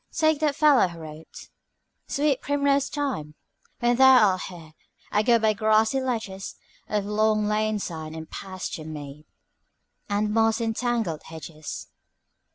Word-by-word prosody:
Take 315 -2 +2
that 300 -3 +1
fellow 295 -9 +5
who 170 -1 -10
wrote 160 0 -11 0.6
"'Sweet 285 -2 +1
primrose 280 -1 +1
time! 255 - -3 0.5
When 240 0 +2
thou 260 -5 +7
art 185 0 -3
here 165 -4 -12 0.4
I 210 - +3
go 235 +2 +4
by 220 -1 +2
grassy 220 +4 +2
ledges 220 -7 -4 0.3
Of 210 -2 0
long 215 0 +2
lane 215 +1 0
side, 160 -5 -5
and 160 0 -7
pasture 185 -4 -6
mead, 150 -1 -9 0.8
And 210 +1 0
moss 225 0 +3
entangled 225 -7 -1
hedges.' 160 -1 -8
215 Hz, 135 wpm, -25 LUFS, 170-250 Hz, 0.8 s, thou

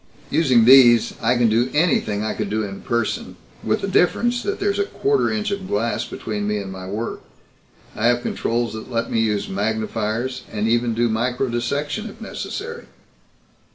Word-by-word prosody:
Using 130 -8 +4
these 120 -3 +7
I 125 - +2
can 120 -1 +4
do 115 +3 +2
anything 135 -10 +1
I 110 - -1
could 105 -2 -4
in 105 -2 -3
person 120 -2 -2 0.3
with - - 0
the 195 - -2
difference 240 +6 +2
that 405 - -3
there's 400 0 0
a 405 - +2
quarter 415 +1 +1
inch 215 -1 -2
of 200 -1 -4
glass 115 +3 -1
between 105 -2 -4
me 105 0 0
and 100 -2 -5
my 95 -1 -8
work. 105 +4 -4 0.7
I 110 - +1
have 120 0 +2
controls 115 -1 -1
that 110 +3 -8
let 115 -2 -2
me 115 - +1
use 105 -2 0
magnifiers, 110 +4 -2
and 110 0 -1
even 120 0 +1
do 120 +1 +2
microdissection, 125 - -1
if - - -13
necessary." 475 0 -6
120 Hz, 170 wpm, -21 LUFS, 110-145 Hz, 0.7 s, these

